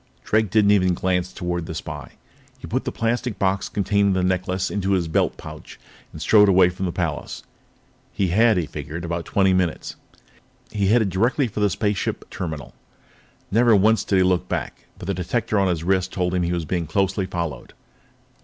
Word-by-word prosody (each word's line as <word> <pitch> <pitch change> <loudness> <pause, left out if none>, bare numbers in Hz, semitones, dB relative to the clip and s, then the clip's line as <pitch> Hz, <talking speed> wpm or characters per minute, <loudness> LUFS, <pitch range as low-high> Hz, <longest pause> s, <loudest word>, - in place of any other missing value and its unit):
Drake 110 -1 +1
didn't 105 0 +4
even 95 -3 +3
glance 90 0 -1
toward 90 -2 -4
the - - -6
spy. - - -7 0.4
He - - -10
put - - -2
the - - -2
plastic 120 0 -2
box 95 0 0
containing 100 0 +1
the 95 -1 0
necklace 90 0 -1
into 100 -1 0
his 90 -3 +1
belt 80 - 0
pouch - - -11 0.3
and 80 - -10
strode 105 +5 +5
away 90 -1 +5
from 90 +1 -4
the - - -2
palace. 80 -4 -4 0.7
He 100 -3 -1
had, 110 +4 +4
he 85 - 0
figured, 75 +3 -6
about 85 0 -3
twenty 95 -1 +2
minutes. 90 -3 -1 0.8
He 100 -2 0
headed 110 -2 +3
directly 120 - +1
for 105 - -6
the 105 -1 +3
spaceship 105 0 -2
terminal. 80 -7 -6 0.8
Never 115 +2 +5
once 110 +3 +3
did 100 - +1
he 95 - +4
look 90 -1 +1
back, - - -4
but - - -9
the 100 - -1
detector 105 +4 -1
on 95 - +2
his 85 -3 -1
wrist 95 0 +1
told 90 -1 -1
him 90 - +1
that 85 - 0
he - - -1
was 85 -2 -3
being 85 0 -2
closely 95 +3 0
followed. 85 -8 -5
95 Hz, 190 wpm, -22 LUFS, 90-100 Hz, 0.8 s, strode